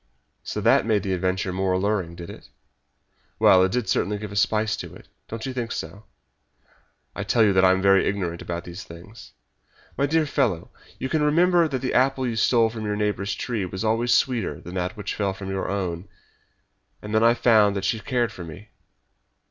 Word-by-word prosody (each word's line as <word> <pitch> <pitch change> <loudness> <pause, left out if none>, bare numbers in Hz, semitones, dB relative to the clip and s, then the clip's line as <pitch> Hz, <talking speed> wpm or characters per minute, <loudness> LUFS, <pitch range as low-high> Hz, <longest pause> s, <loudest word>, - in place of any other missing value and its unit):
So - - -5
that - - +3
made 105 -4 +2
the 95 - -1
adventure 95 0 -1
more 95 0 0
alluring, 95 -3 -1
did 85 0 -8
it?" - - -14 0.9
"Well, 95 - +6
it 95 - +1
did 125 -2 -1
certainly 105 +1 0
give 105 -1 -7
a - - -8
spice 110 +2 +1
to - - -7
it. - - -15 0.2
Don't 110 0 -6
you 130 - -4
think 120 -2 -4
so?" 95 +7 -6 1.1
"I - - -3
tell 115 - +3
you 100 -2 +4
that 95 0 +4
I 95 - +6
am 95 +1 +2
very 95 0 +4
ignorant 90 -4 -2
about 85 0 -5
these 85 +2 -8
things." 90 +7 -13 0.7
"My 140 - +2
dear 160 +1 +2
fellow, 125 - -1 0.3
you 130 - -3
can 155 +3 0
remember 170 +3 +4
that 135 -3 -4
the 130 - -1
apple 130 +1 +2
you 120 -2 -2
stole 115 0 +3
from 110 -1 -6
your 105 -1 -2
neighbour's 105 -1 -1
tree 115 -5 -3
was 95 +2 -5
always 115 +2 +1
sweeter 120 -7 +1
than 90 - -10
that 90 +3 -3
which 100 -1 -4
fell 100 -2 -2
from 95 0 -6
your 95 -1 -3
own. 95 -2 -3 1.0
And 105 +1 -6
then 110 +1 +3
I 115 +1 +5
found 105 -4 +4
that 100 -1 -2
she 110 - 0
cared 120 -1 -1
for 95 - -9
me." 85 +6 -11
105 Hz, 205 wpm, -24 LUFS, 95-120 Hz, 1.1 s, Well